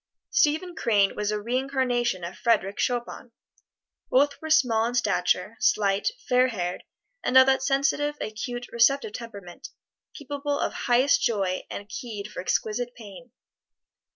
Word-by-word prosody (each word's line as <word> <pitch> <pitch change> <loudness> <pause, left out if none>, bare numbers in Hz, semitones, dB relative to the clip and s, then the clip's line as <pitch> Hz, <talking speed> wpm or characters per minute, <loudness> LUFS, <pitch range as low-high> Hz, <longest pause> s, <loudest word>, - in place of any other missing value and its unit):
Stephen 350 -1 +2
Crane 205 -7 +2
was 210 0 -2
a 210 0 -1
reincarnation 245 -3 -1
of 170 +2 -6
Frederic 205 -4 0
Chopin. 245 -1 -2 0.8
Both 280 +2 +2
were 315 - -6
small 230 -7 +3
in 245 - -4
stature, 245 - 0
slight, 200 - +2 0.2
fair 255 -1 +4
haired, 180 -7 -4 0.4
and 260 - +3
of 260 - +9
that 265 0 +2
sensitive, 280 +2 +1
acute, 240 +3 -5
receptive 235 -1 +2
temperament 200 -7 -9 0.5
capable 285 0 -3
of - - -2
highest 255 +3 +2
joy 195 -5 -1
and 200 - -7
keyed 215 -4 -7
for - - -6
exquisite 235 +6 -2
pain. 220 +2 -12
240 Hz, 135 wpm, -26 LUFS, 210-270 Hz, 0.8 s, of